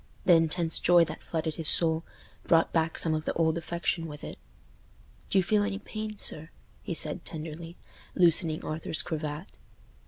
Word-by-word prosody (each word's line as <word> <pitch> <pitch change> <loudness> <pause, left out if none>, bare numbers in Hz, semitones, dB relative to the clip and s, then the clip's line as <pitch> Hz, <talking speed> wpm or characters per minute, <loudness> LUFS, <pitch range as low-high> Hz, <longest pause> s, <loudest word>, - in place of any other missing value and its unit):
The 180 - +6
intense 165 0 +1
joy 175 -1 +5
that 155 - -8
flooded 160 -1 -3
his 160 -2 +3
soul 160 -1 +4 0.4
brought 165 -1 +3
back 165 -1 0
some 160 - +2
of 155 0 -2
the - - -1
old 160 -1 +1
affection 170 0 -2
with 150 -1 -10
it. - - -8 0.9
"Do - - +1
you 190 - +4
feel 210 +3 +2
any 205 -1 -1
pain, 215 0 -6
sir?" 160 -4 -5 0.3
he 170 - -5
said, 155 -1 -1
tenderly, 165 +1 -8 0.4
loosening 165 -2 +3
Arthur's 155 +1 -1
cravat. 155 +1 -5
165 Hz, 165 wpm, -28 LUFS, 155-175 Hz, 0.9 s, The